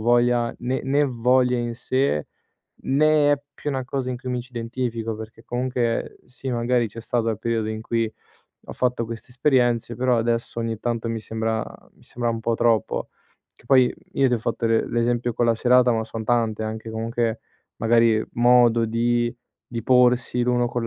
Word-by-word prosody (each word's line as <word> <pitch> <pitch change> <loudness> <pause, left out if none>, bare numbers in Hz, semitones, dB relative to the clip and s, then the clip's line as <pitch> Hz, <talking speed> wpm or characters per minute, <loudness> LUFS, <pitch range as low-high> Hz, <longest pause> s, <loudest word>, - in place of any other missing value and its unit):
voglia, 120 +1 +2
né 130 +2 -2
né 140 +2 +2
voglia 125 0 +2
in 120 -1 -3
sé, 130 - 0 0.6
né 150 +1 +3
è 140 - 0
più 150 - -4
una 130 -2 -2
cosa 130 0 -3
in 125 - -3
cui 125 +1 -6
mi 125 -1 -1
ci 125 - -12
identifico, 115 -1 -3
perché 110 +1 -10
comunque 120 -1 -2
sì, 130 +1 -7
magari 120 -1 +1
c'è 115 +3 -9
stato 115 0 -1
il 110 - -1
periodo 115 -2 -1
in 110 0 -4
cui 115 -1 -1 0.5
ho - - -7
fatto 125 -2 0
queste 115 +2 -8
esperienze, 120 -3 +1
però 125 0 +1
adesso 115 0 -1
ogni 115 -1 -2
tanto 115 -1 -2
mi 115 -1 -3
sembra 110 0 -2 0.3
mi - - -25
sembra 120 -1 -3
un 115 0 -3
po' 115 +1 0
troppo. 115 -3 +1 0.5
Che - - -24
poi, 130 -1 +5 0.2
io 135 -1 +3
ti 125 - +2
ho - - -1
fatto 115 +1 -2
le 115 0 +1
l'esempio 120 0 0
con 120 +1 0
la 115 - +3
serata, 125 +1 +4
ma 110 -1 -1
son 110 0 -6
tante, 115 -2 0
anche 110 +1 -5
comunque, 115 0 -2 0.4
magari, 115 -1 +3
modo 120 -1 +4
di 120 +1 +1 0.4
di 115 -1 -4
porsi 125 -1 +3
l'uno 120 0 +2
con 120 -1 -2
120 Hz, 185 wpm, -23 LUFS, 115-125 Hz, 0.6 s, poi